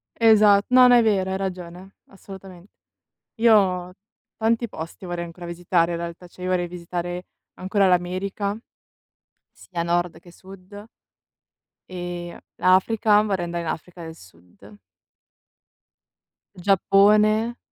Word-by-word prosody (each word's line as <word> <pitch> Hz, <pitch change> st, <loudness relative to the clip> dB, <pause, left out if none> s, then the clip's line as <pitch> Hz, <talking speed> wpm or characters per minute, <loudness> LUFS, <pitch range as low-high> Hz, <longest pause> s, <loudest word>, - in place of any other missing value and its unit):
Esat 210 Hz, -3 st, +5 dB
no, 250 Hz, 0 st, +7 dB
no, 245 Hz, -, +6 dB
è 240 Hz, -, +5 dB
vero, 195 Hz, -4 st, +1 dB
hai 190 Hz, -, -2 dB
ragione, 185 Hz, 0 st, -7 dB
assolutamente. 190 Hz, -1 st, -13 dB, 0.6 s
Io 190 Hz, -6 st, +2 dB, 0.4 s
tanti 230 Hz, +1 st, 0 dB
posti 165 Hz, +3 st, -9 dB
vorrei 175 Hz, -1 st, -4 dB
ancora 170 Hz, +1 st, -11 dB
visitare 170 Hz, 0 st, 0 dB
in 170 Hz, -, -3 dB
realtà, 170 Hz, +1 st, -8 dB
cioè 180 Hz, +1 st, -13 dB
io 185 Hz, -, -3 dB
vorrei 180 Hz, -1 st, 0 dB
visitare 175 Hz, 0 st, -6 dB, 0.3 s
ancora 195 Hz, +1 st, +1 dB
l'America, 185 Hz, +3 st, -1 dB, 0.9 s
sia 170 Hz, -2 st, -6 dB
nord 175 Hz, -1 st, -1 dB
che 175 Hz, 0 st, -17 dB
sud. 195 Hz, +3 st, -14 dB, 1.0 s
Ehm, 175 Hz, -1 st, -7 dB, 0.2 s
l'Africa 210 Hz, +3 st, +3 dB
vorrei 195 Hz, -5 st, -2 dB
andare 170 Hz, 0 st, -4 dB
in 165 Hz, -, -4 dB
Africa 175 Hz, +2 st, -7 dB
del 160 Hz, 0 st, -9 dB
sud. 95 Hz, -, -18 dB, 1.8 s
Giappone. 210 Hz, +4 st, +3 dB
185 Hz, 120 wpm, -23 LUFS, 175-205 Hz, 1.8 s, no